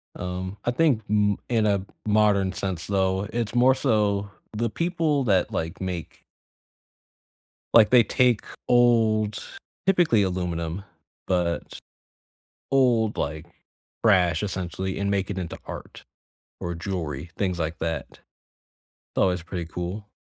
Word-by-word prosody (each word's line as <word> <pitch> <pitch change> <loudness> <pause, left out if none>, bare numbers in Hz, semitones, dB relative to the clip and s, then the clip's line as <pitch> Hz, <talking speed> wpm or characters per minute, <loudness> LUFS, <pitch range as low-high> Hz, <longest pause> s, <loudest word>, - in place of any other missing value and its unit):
Um, 90 +2 -5
I 120 - +1
think 130 -4 +2
m 105 -1 +2
in 115 -3 +2
a 100 -2 +1 0.2
modern 105 -3 +3
sense 95 -4 -4
though, 95 0 +1
it's 115 -1 -2
more 125 +2 +6
so 105 -6 +1 0.3
the 115 +2 0
people 165 - 0
that, 95 -7 +2
like, 80 +4 -3
make 90 -3 -5 1.5
like 110 -2 +7
they 125 -2 +7
take 125 -2 +2 0.3
old 110 -3 +3 0.4
typically 175 - +4
aluminum, 90 -1 -2 0.4
but 90 -2 -1 0.9
old, 120 -5 +3
like, 75 +3 -3 0.6
trash 90 -6 +4
essentially, 95 -1 -3
and 100 0 0
make 100 -1 0
it 100 - -4
into 90 -3 -4
art - - -9 0.6
or 85 - -3
jewelry, 85 -4 -4
things 90 -3 -1
like 80 +1 -3
that. 80 -3 -2
It's - - -20 1.0
always 90 -2 +2
pretty 85 0 -5
cool. 90 +5 -5
100 Hz, 125 wpm, -25 LUFS, 90-110 Hz, 1.5 s, like